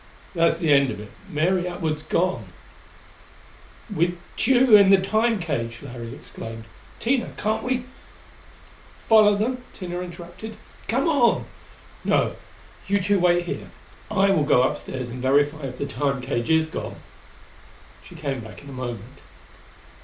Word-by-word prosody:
"That's 165 Hz, -2 st, +3 dB
the 165 Hz, -4 st, +3 dB
end 140 Hz, -1 st, +5 dB
of 105 Hz, -, -5 dB
it. 105 Hz, -1 st, -10 dB, 0.2 s
Mary 175 Hz, +4 st, +1 dB
Atwood's 160 Hz, -4 st, -2 dB
gone 160 Hz, -, 0 dB, 0.8 s
" -, -, -16 dB
"With 175 Hz, +2 st, +1 dB, 0.2 s
Tugh 255 Hz, -1 st, +4 dB
in 200 Hz, -2 st, +9 dB
the 195 Hz, -, +8 dB
Time 220 Hz, +4 st, +2 dB
cage!" 125 Hz, -, -3 dB
Larry 120 Hz, -4 st, -7 dB
exclaimed. 115 Hz, 0 st, -8 dB, 0.4 s
"Tina, 250 Hz, +1 st, 0 dB
can't 215 Hz, +1 st, 0 dB
we 255 Hz, -1 st, -1 dB, 0.6 s
" -, -, -24 dB
"Follow 215 Hz, -2 st, +6 dB
them?" 250 Hz, +5 st, -1 dB, 0.2 s
Tina 175 Hz, -2 st, -4 dB
interrupted. 175 Hz, +4 st, -8 dB, 0.3 s
"Come -, -, +1 dB
on! 280 Hz, -7 st, +3 dB, 0.6 s
No -, -, +2 dB, 0.5 s
you 200 Hz, +1 st, +2 dB
two 200 Hz, +1 st, +2 dB
wait 175 Hz, 0 st, +3 dB
here. -, -, -5 dB, 0.4 s
I 195 Hz, -2 st, +3 dB
will 160 Hz, -6 st, +3 dB
go 125 Hz, -3 st, +4 dB
upstairs 130 Hz, -1 st, -3 dB
and 125 Hz, +1 st, -6 dB
verify 145 Hz, +2 st, +2 dB
if 125 Hz, -1 st, -8 dB
the 140 Hz, -, -2 dB
Time 140 Hz, -1 st, -1 dB
cage 125 Hz, -2 st, -2 dB
is 160 Hz, 0 st, +4 dB
gone." -, -, -5 dB, 1.1 s
She 175 Hz, -, -13 dB
came 140 Hz, -5 st, -3 dB
back 110 Hz, +2 st, -10 dB
in 140 Hz, -, -11 dB
a -, -, -8 dB
moment. 125 Hz, 0 st, -6 dB
170 Hz, 150 wpm, -24 LUFS, 135-200 Hz, 1.1 s, in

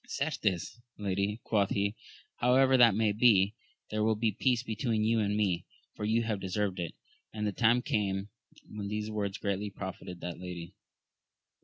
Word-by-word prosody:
Certes, 115 Hz, -, -1 dB, 0.2 s
lady, 100 Hz, +2 st, -1 dB
quoth 100 Hz, -3 st, +2 dB
he, 100 Hz, +1 st, 0 dB, 0.4 s
however 130 Hz, +2 st, +4 dB
that 120 Hz, -5 st, +6 dB
may 110 Hz, -1 st, +2 dB
be, 105 Hz, -2 st, +4 dB, 0.4 s
there 105 Hz, 0 st, 0 dB
will 110 Hz, 0 st, +3 dB
be 110 Hz, +1 st, +1 dB
peace 120 Hz, +3 st, +1 dB
between 110 Hz, -1 st, -1 dB
you 115 Hz, +1 st, +2 dB
and 105 Hz, -1 st, +1 dB
me, 95 Hz, -5 st, +1 dB, 0.3 s
for 105 Hz, -, -4 dB
you 115 Hz, +2 st, +2 dB
have 110 Hz, -3 st, -1 dB
deserved 95 Hz, 0 st, -2 dB
it. 85 Hz, -2 st, -4 dB, 0.4 s
And 105 Hz, -1 st, -3 dB
the 105 Hz, -, +1 dB
time 120 Hz, +4 st, +3 dB
came 100 Hz, -2 st, -1 dB, 0.4 s
when 105 Hz, -1 st, -6 dB
these 105 Hz, +1 st, -3 dB
words 100 Hz, -2 st, -2 dB
greatly 100 Hz, 0 st, -2 dB
profited 95 Hz, -2 st, -7 dB
that 85 Hz, -1 st, -5 dB
lady. 90 Hz, 0 st, -7 dB
105 Hz, 165 wpm, -31 LUFS, 100-110 Hz, 0.4 s, that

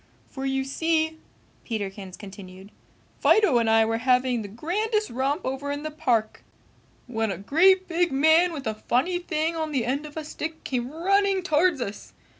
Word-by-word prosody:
For 270 Hz, 0 st, -4 dB
you 270 Hz, 0 st, 0 dB
see," 320 Hz, +3 st, 0 dB, 0.4 s
Peterkins 195 Hz, -4 st, -5 dB
continued, 195 Hz, -1 st, -11 dB, 0.5 s
"Fido 375 Hz, -, +4 dB
and 230 Hz, -1 st, +1 dB
I 225 Hz, 0 st, +5 dB
were 225 Hz, +1 st, -1 dB
having 250 Hz, -1 st, +2 dB
the 205 Hz, -, -6 dB
grandest 420 Hz, -, -1 dB
romp 275 Hz, +7 st, -1 dB
over 270 Hz, +2 st, -3 dB
in 285 Hz, +1 st, -4 dB
the 310 Hz, -, -4 dB
park 245 Hz, -8 st, -1 dB, 0.6 s
when 225 Hz, -3 st, -2 dB
a -, -, -4 dB
great 370 Hz, -, +4 dB
big 345 Hz, -1 st, +1 dB
man 315 Hz, +6 st, +4 dB
with 285 Hz, -5 st, -6 dB
a 220 Hz, -, -1 dB
funny 260 Hz, +11 st, 0 dB
thing 325 Hz, -1 st, -1 dB
on 315 Hz, -1 st, -3 dB
the 260 Hz, -6 st, 0 dB
end 280 Hz, +5 st, -2 dB
of 295 Hz, -, -12 dB
a 315 Hz, -, -4 dB
stick 315 Hz, +1 st, -6 dB
came 245 Hz, -2 st, -2 dB
running 385 Hz, +4 st, +1 dB
towards 315 Hz, -3 st, +2 dB
us. 200 Hz, -2 st, -6 dB
280 Hz, 175 wpm, -25 LUFS, 230-330 Hz, 0.6 s, I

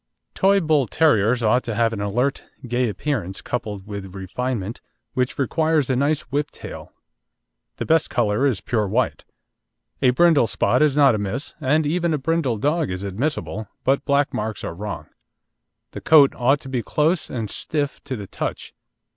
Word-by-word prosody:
Toy 195 Hz, +1 st, +4 dB
Bull 155 Hz, -7 st, +2 dB
terriers 120 Hz, -5 st, +3 dB
ought 125 Hz, +3 st, +3 dB
to 115 Hz, -2 st, -3 dB
have 115 Hz, 0 st, +2 dB
an 100 Hz, -, -4 dB
alert, 120 Hz, +7 st, -1 dB, 0.2 s
gay 120 Hz, 0 st, 0 dB
appearance, 105 Hz, -6 st, -3 dB
coupled 105 Hz, -5 st, -4 dB
with 100 Hz, -2 st, -7 dB
refinement, 110 Hz, +2 st, -4 dB, 0.3 s
which 125 Hz, -1 st, -1 dB
requires 155 Hz, +1 st, +1 dB
a -, -, +2 dB
nice 145 Hz, +4 st, +1 dB
whip 145 Hz, +1 st, 0 dB
tail. -, -, -10 dB, 0.9 s
The -, -, -3 dB
best 160 Hz, -1 st, +2 dB
colour 115 Hz, +2 st, +1 dB
is 125 Hz, -8 st, -1 dB
pure 110 Hz, -4 st, 0 dB
white. 120 Hz, +6 st, -1 dB, 0.8 s
A 130 Hz, -, +5 dB
brindle 145 Hz, -1 st, +4 dB
spot -, -, +1 dB
is 150 Hz, -2 st, +3 dB
not 140 Hz, -4 st, +6 dB
amiss, 110 Hz, +6 st, -3 dB
and 150 Hz, +3 st, +2 dB
even 170 Hz, +1 st, +1 dB
a -, -, -1 dB
brindle 145 Hz, -4 st, 0 dB
dog 150 Hz, -, 0 dB
is 90 Hz, +1 st, -4 dB
admissible, 110 Hz, 0 st, -3 dB, 0.2 s
but 135 Hz, +1 st, +2 dB
black 140 Hz, 0 st, +1 dB
marks 110 Hz, -2 st, -3 dB
are -, -, -4 dB
wrong. 100 Hz, +2 st, -6 dB, 0.9 s
The -, -, -8 dB
coat 145 Hz, -4 st, +6 dB
ought 135 Hz, +4 st, +2 dB
to 135 Hz, -, -9 dB
be 130 Hz, -2 st, -1 dB
close 155 Hz, +7 st, +1 dB
and 115 Hz, -4 st, -3 dB
stiff 145 Hz, +6 st, -3 dB
to 135 Hz, -2 st, -3 dB
the 105 Hz, -4 st, -7 dB
touch. -, -, -5 dB
125 Hz, 170 wpm, -22 LUFS, 110-145 Hz, 0.9 s, not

